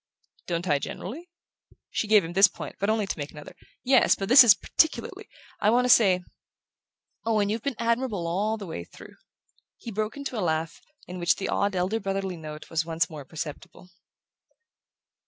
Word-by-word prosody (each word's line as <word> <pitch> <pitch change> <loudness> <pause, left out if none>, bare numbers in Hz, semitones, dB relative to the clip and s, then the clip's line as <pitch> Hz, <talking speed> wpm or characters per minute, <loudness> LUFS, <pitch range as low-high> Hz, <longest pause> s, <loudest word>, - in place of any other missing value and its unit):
"Don't 175 +1 -2
I, 145 -3 +2
generally?" 285 - -7 0.6
She 220 - -2
gave 210 -2 +5
him 170 - -7
this 195 +3 +7
point, - - -9
but 200 - 0
only 215 -1 +1
to 195 - -4
make 145 0 -4
another. 150 -1 -12 0.3
"Yes; 260 0 +4
but 195 - -5
this 255 +1 +10
is 220 -5 +7
particularly. 320 +8 -1 0.3
I 210 - +3
want 245 +3 +3
to - - 0
say...Owen, 205 +1 -1
you've 220 +2 -2
been 280 +1 -3
admirable 230 -5 -1
all 205 +6 -1
through." 165 - -9 0.6
He 230 - -8
broke 215 +4 -3
into 275 -5 -5
a - - -1
laugh 160 -2 -2 0.2
in 180 +1 -8
which 175 0 +2
the 195 - -4
odd 200 -1 0
elder 185 +5 0
brotherly 195 -2 -3
note 155 -2 -9
was 165 0 0
once 165 +1 -1
more 150 -3 -8
perceptible. 160 +4 -8
195 Hz, 170 wpm, -26 LUFS, 170-225 Hz, 0.6 s, this